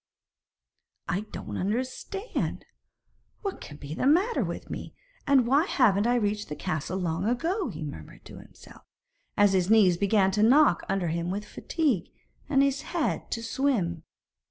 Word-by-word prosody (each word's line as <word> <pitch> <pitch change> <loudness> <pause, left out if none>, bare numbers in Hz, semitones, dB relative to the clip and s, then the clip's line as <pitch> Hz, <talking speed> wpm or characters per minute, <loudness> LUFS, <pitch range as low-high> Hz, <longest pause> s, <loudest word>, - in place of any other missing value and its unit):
'I 185 -1 +1
don't 105 - -6
understand! 255 - -3 0.8
What 395 -2 -4
can 145 - -10
be 145 0 -7
the 255 - 0
matter 370 +11 +3
with - - -5
me - - -7 0.3
and 270 -3 +5
why 280 +7 +3
haven't 220 - +3
I 245 - +3
reached 210 -2 -1
the 150 - -4
castle 155 +4 -3
long 175 0 -2
ago?' 340 - -1
he 155 0 -6
murmured 80 - -9
to - - -11
himself, - - -16 0.6
as 205 -1 +5
his 185 -1 +2
knees 200 -6 +5
began 200 0 +3
to 210 +2 0
knock 250 - +5
under 190 -3 0
him 170 +2 -2
with 205 +3 -3
fatigue, 260 - -1 0.4
and 275 -1 +4
his 275 0 +1
head - - -2
to 230 - -3
swim. 225 - 0
210 Hz, 155 wpm, -27 LUFS, 180-270 Hz, 0.8 s, and